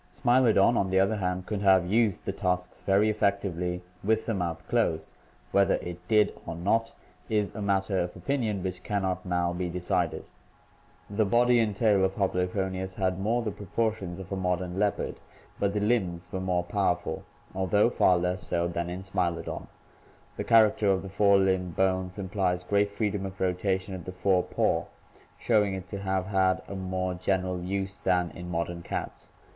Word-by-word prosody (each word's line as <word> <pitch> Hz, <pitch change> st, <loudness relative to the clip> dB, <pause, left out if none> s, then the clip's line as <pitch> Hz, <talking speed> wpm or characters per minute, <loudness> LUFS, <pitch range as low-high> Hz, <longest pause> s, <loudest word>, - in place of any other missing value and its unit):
Smilo 120 Hz, -1 st, +3 dB
don, 110 Hz, +3 st, +4 dB
on 95 Hz, -, +1 dB
the 95 Hz, 0 st, +3 dB
other 100 Hz, +3 st, +2 dB
hand, 90 Hz, -1 st, -2 dB
could 105 Hz, -1 st, -3 dB
have 95 Hz, -3 st, +5 dB
used 110 Hz, +1 st, +1 dB
the -, -, -1 dB
tusks 90 Hz, 0 st, -2 dB
very 100 Hz, +2 st, +3 dB
effectively 95 Hz, -4 st, 0 dB, 0.2 s
with 110 Hz, +2 st, +1 dB
the 115 Hz, -, -1 dB
mouth 85 Hz, -3 st, -3 dB
closed; 85 Hz, -10 st, +1 dB, 0.4 s
whether 100 Hz, -1 st, +4 dB
it 90 Hz, +1 st, -7 dB
did 105 Hz, -2 st, +4 dB
or 85 Hz, -, -4 dB
not 110 Hz, +7 st, +1 dB, 0.4 s
is 105 Hz, -2 st, 0 dB
a 105 Hz, -, -6 dB
matter 95 Hz, -1 st, +1 dB
of 90 Hz, 0 st, -2 dB
opinion 115 Hz, -9 st, -1 dB
which 90 Hz, -1 st, -4 dB
can 100 Hz, -2 st, -2 dB
not 95 Hz, -1 st, -1 dB
now 90 Hz, -1 st, 0 dB
be 90 Hz, 0 st, -2 dB
decided. 90 Hz, +1 st, -1 dB, 0.8 s
The 105 Hz, +2 st, +1 dB
body 120 Hz, +3 st, +4 dB
and 110 Hz, -3 st, +1 dB
tail 105 Hz, -3 st, +3 dB
of 95 Hz, 0 st, +1 dB
Hoplophoneus 95 Hz, 0 st, -1 dB
had 95 Hz, -2 st, 0 dB
more 115 Hz, +5 st, +1 dB
the 110 Hz, -, -2 dB
proportions 100 Hz, -2 st, -2 dB
of 95 Hz, 0 st, -9 dB
a -, -, -1 dB
modern 90 Hz, 0 st, -1 dB
leopard, 105 Hz, -1 st, 0 dB, 0.4 s
but 100 Hz, 0 st, 0 dB
the -, -, +2 dB
limbs 95 Hz, -6 st, 0 dB
were 95 Hz, -, -3 dB
more 90 Hz, -1 st, 0 dB
powerful, 90 Hz, -1 st, -1 dB, 0.3 s
although 95 Hz, +4 st, +2 dB
far 90 Hz, -5 st, +4 dB
less 90 Hz, +1 st, -1 dB
so 85 Hz, 0 st, -1 dB
than 85 Hz, 0 st, -3 dB
in 90 Hz, +2 st, -5 dB
Smilodon. 85 Hz, -3 st, -2 dB, 0.7 s
The -, -, -3 dB
char 115 Hz, -2 st, +6 dB
acter 105 Hz, -1 st, +1 dB
of 95 Hz, 0 st, 0 dB
the 95 Hz, -, -7 dB
fore 100 Hz, +1 st, +4 dB
limb 95 Hz, -2 st, +1 dB
bones 95 Hz, +1 st, 0 dB
implies 95 Hz, -2 st, -1 dB
great 100 Hz, +2 st, +2 dB
freedom 100 Hz, -1 st, -2 dB
of 95 Hz, 0 st, -6 dB
rotation 95 Hz, +1 st, -1 dB
of 90 Hz, -2 st, -7 dB
the 90 Hz, -, -5 dB
fore 90 Hz, 0 st, +2 dB
paw, -, -, 0 dB, 0.5 s
showing 105 Hz, -4 st, +2 dB
it 95 Hz, -1 st, -7 dB
to 100 Hz, -, -4 dB
have 95 Hz, -1 st, -1 dB
had 95 Hz, -1 st, +1 dB
a -, -, -6 dB
more 95 Hz, -1 st, -2 dB
general 90 Hz, 0 st, -1 dB
use 95 Hz, +2 st, -3 dB
than 90 Hz, -2 st, +1 dB
in 90 Hz, 0 st, -8 dB
modern 85 Hz, 0 st, -3 dB
cats. -, -, -6 dB
95 Hz, 185 wpm, -28 LUFS, 90-100 Hz, 0.8 s, char